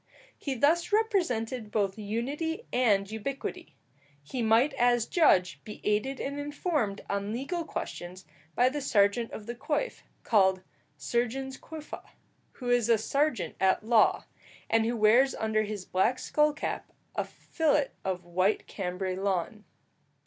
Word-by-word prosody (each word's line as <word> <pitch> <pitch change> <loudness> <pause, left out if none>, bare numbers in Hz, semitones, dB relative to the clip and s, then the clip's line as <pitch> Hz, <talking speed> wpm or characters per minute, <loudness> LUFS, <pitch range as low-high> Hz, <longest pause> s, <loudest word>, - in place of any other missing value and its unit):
He 275 -2 -4
thus 320 - +2
represented 260 - 0
both 200 -3 0
unity 275 - -3
and 210 -6 +3
ubiquity. 275 - -5 0.5
He 245 - -4
might 230 +6 +4
as 240 -3 +3
judge 185 - +3
be 210 - -9
aided 235 +6 0
and 280 +1 -3
informed 290 - -1
on 200 +1 -2
legal 275 +9 -3
questions 180 - -6 0.3
by 250 +1 +4
the 290 +2 -4
serjeant 220 -2 +2
of 210 - -8
the 240 - -4
coif, 295 - -2 0.2
called 190 -4 +3 0.3
sergens 245 - -2
coifæ, 310 -1 -8 0.5
who 245 -2 -3
is 240 -2 +3
a 230 - +6
serjeant 275 +1 0
at 190 +2 +3
law, 225 -1 +4 0.5
and 225 0 +3
who 235 0 -1
wears 235 +5 +5
under 220 0 0
his 210 -3 -4
black 220 +7 +1
skull 300 +3 +2
cap 295 - -4 0.2
a - - 0
fillet 300 -3 0
of 185 -2 -3
white 185 +4 +1
Cambray 185 -1 -3
lawn. 195 +2 -2
230 Hz, 140 wpm, -29 LUFS, 205-280 Hz, 0.5 s, a